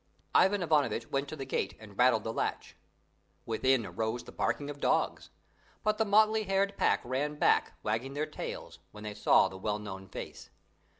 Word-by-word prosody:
Ivan 195 -1 +4
Ivanovitch 145 -8 +1
went 140 +1 0
up - - -12
to - - -5
the 135 -3 -6
gate 130 - -2
and 105 -2 -13
rattled 125 -1 +4
the 110 - -3
latch. - - -3 0.7
Within 115 +1 +2
arose 110 +3 -3
the - - -11
barking 145 - -1
of 145 - -10
dogs; - - 0 0.5
but 215 0 +1
the 220 - +3
motley 215 +1 +4
haired 195 +1 +1
pack - - +2
ran 140 +4 -1
back, - - +3
wagging 120 +6 -2
their 150 +1 0
tails 155 - -7
when 105 0 -11
they 105 -1 -5
saw 100 - +4
the 95 0 -9
well 105 +1 -1
known 95 -2 -8
face. - - -8
135 Hz, 185 wpm, -31 LUFS, 110-160 Hz, 0.7 s, Ivan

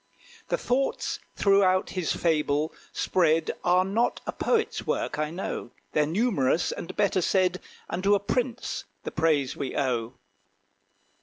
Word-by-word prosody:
The - - 0
thoughts 270 +2 -1 0.2
throughout 195 -2 +3
his 185 -4 -1
fable 155 -2 +1 0.2
spread 165 -3 +2
Are 180 +1 +4
not 225 +5 +1
a - - -2
poet's 455 -2 0
work, - - -1
I 155 0 0
know. 170 -7 -4 0.2
They're 150 -1 +2
numerous 170 - +1
and 170 - -6
better 200 -2 +2
said; 185 0 +2 0.3
Unto 195 +4 +2
a - - +2
prince 245 +4 -2 0.2
the - - -4
praise 150 -4 +1
we 135 - -4
owe. 125 -4 0
180 Hz, 135 wpm, -27 LUFS, 155-200 Hz, 0.3 s, Are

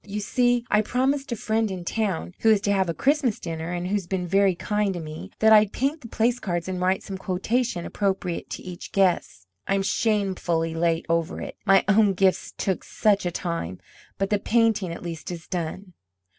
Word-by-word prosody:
You 210 0 -5
see, 245 +3 +1
I 210 - +5
promised 265 +4 0
a - - 0
friend 220 0 0
in 185 -2 -6
town, 195 -4 -2
who 225 - +3
is 215 -2 +5
to 200 - 0
have 190 -3 +2
a - - 0
Christmas 275 - +1
dinner, 165 0 -5
and 175 0 -3
who's 195 -2 -1
been 185 -1 -2
very 195 +1 +3
kind 210 +1 -1
to - - -3
me, 155 +4 -7
that 220 0 +6
I'd 210 -1 +6
paint 285 +5 -1
the 230 - -9
place 235 +2 +1
cards 175 -5 -3
and 185 -1 -3
write 185 +1 +1
some 190 -1 -6
quotation 195 +1 -1
appropriate 190 -3 -2
to - - -6
each 180 -1 -9
guest. 180 - +1 0.2
I'm 195 0 +1
shamefully 190 -6 0
late 165 0 0
over 165 +1 0
it, - - -6
my 195 0 +5
own 205 -1 +4
gifts 190 0 +1
took 190 -2 -1
such 205 -4 +1
a - - -1
time; 165 - -4 0.4
but 195 +1 -1
the 205 - +3
painting, 220 -5 +2
at 170 - -7
least, 165 -2 -6
is 170 -2 -7
done." 180 +2 -4
195 Hz, 200 wpm, -25 LUFS, 175-215 Hz, 0.4 s, that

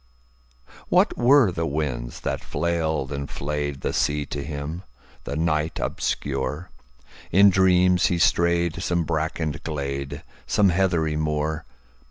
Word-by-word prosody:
What - - +3
were 125 -4 +5
the 85 -1 -2
winds 65 -6 -3
that - - -3
flailed 80 -5 -1
and 70 -1 -4
flayedThe 70 -1 -3
sea 75 0 0
to 70 0 -5
him, 75 +3 -5 0.4
the 70 - -4
night 80 0 0
obscure? 70 +5 -3 0.6
In 100 +2 +7
dreams 90 -1 +4
he 90 - 0
strayed 85 0 +2
some 85 -1 0
brackened 80 -1 -2
glade, 70 -3 -4 0.2
Some 100 -2 +3
heathery 85 -4 +1
moor. 75 +1 -1
80 Hz, 120 wpm, -24 LUFS, 75-85 Hz, 0.6 s, In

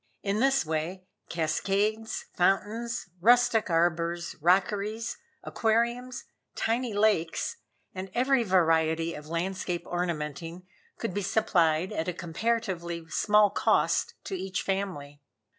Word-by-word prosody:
In 200 +1 0
this 270 -3 +3
way, 160 +4 -3 0.3
cascades, 200 +7 -1
fountains, 210 +4 0
rustic 240 +1 +4
arbors, 170 0 0
rockeries, 205 +5 +1 0.2
aquariums, 235 +3 0 0.3
tiny 235 +1 0
lakes, 205 - +1 0.4
and 190 +1 -6
every 260 +1 +3
variety 165 -4 +2
of 150 0 -9
landscape 175 +1 -3
ornamenting, 170 0 -4 0.3
could - - -3
be 205 - -1
supplied 180 -5 +2
at 160 - -2
a 180 - -1
comparatively 175 -2 -2
small 210 +7 +4
cost - - +1
to - - -6
each 190 - -3
family. 175 -8 -3
190 Hz, 110 wpm, -28 LUFS, 170-220 Hz, 0.4 s, rustic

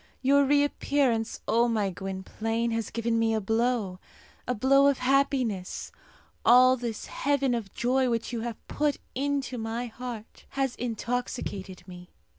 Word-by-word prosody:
Your 280 +2 +5
reappearance, 280 -4 +1
O 235 +2 +3
my 215 -4 0
Gwynplaine, 210 +5 -3
has 225 -1 -2
given 230 0 0
me 225 0 +2
a - - +1
blow 225 -3 0 0.5
a 250 - 0
blow 275 +5 +5
of 280 -2 +3
happiness. 255 -7 0 0.5
All 255 +1 +7
this 235 -3 -5
heaven 280 -2 0
of 220 -5 -3
joy 255 +1 +2
which 230 +1 -2
you 230 - -2
have 235 -1 -4
put 295 -2 0 0.2
into 275 -2 -2
my 225 +2 -3
heart 235 -2 -8
has 270 -2 +1
intoxicated 230 -6 -4
me. 180 -1 -11
235 Hz, 140 wpm, -27 LUFS, 225-260 Hz, 0.5 s, All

